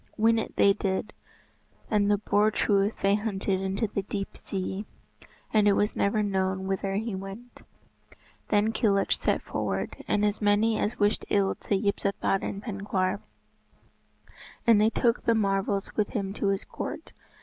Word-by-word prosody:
Win 225 +1 +4
it - - -5
they 200 - +5
did, 195 +1 -2 0.8
and 205 -1 +3
the 205 - +4
Boar 205 +1 +2
Truith 205 -1 +1
they 195 0 +4
hunted 200 -2 -1
into 195 +4 -1
the 205 -1 -2
deep 195 0 -5
sea, 190 +1 -4 0.7
and 210 -1 +4
it 205 - +6
was 205 +2 +1
never 210 +2 +1
known 190 -1 -1
whither 195 0 -1
he 220 +1 -2
went. 195 +6 -8 0.9
Then 210 +1 +2
Kilhuch 200 -3 +1
set - - 0
forward, - - -3
and 210 0 +2
as 210 +1 0
many 210 +2 +3
as 230 +4 -1
wished 205 0 +1
ill 200 -1 +2
to 205 - -2
Yspathaden 200 -1 -1
Penkawr. 195 -3 -1 1.5
And 225 -3 +6
they 215 - +5
took 235 +1 +1
the 230 - +4
marvels 195 -1 0
with 210 -2 +1
them 195 -3 -2
to 205 - -1
his 195 0 0
court. - - -6
205 Hz, 155 wpm, -27 LUFS, 195-215 Hz, 1.5 s, it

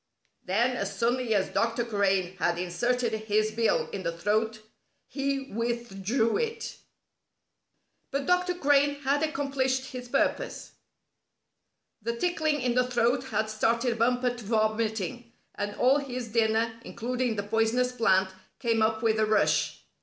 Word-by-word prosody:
Then, 235 +7 +1
as - - -3
suddenly 240 -1 +1
as 190 -2 +1
Dr. 230 +1 0
Crane 195 -4 +1
had 170 -2 +1
inserted 235 +7 0
his 215 0 0
bill 225 0 +1
in 200 - -4
the 170 -2 -1
throat, 215 +6 -1 0.4
he 275 -1 -2
withdrew 230 0 0
it. 460 0 -3 1.3
But 275 0 -2
Dr. 360 +1 +2
Crane 285 -3 +3
had 280 +1 +1
accomplished 275 -3 -1
his 250 -1 -7
purpose. - - -1 1.3
The 235 +2 -2
tickling 310 0 0
in 245 -1 +1
the 250 0 +2
throat 245 +2 +1
had 215 -3 -1
started 230 +2 0
Bumper 245 +1 +2
to 240 -1 -9
vomiting, 220 +1 -1 0.2
and 205 0 -4
all 265 +3 +4
his 255 -4 -5
dinner, 225 0 +2
including 245 0 -2
the 205 - -2
poisonous 225 +4 +1
plant, 190 -6 +3 0.3
came 230 -3 +1
up 220 +1 +1
with 220 -1 +2
a 215 - +3
rush. 215 -1 +1
235 Hz, 140 wpm, -28 LUFS, 215-255 Hz, 1.3 s, all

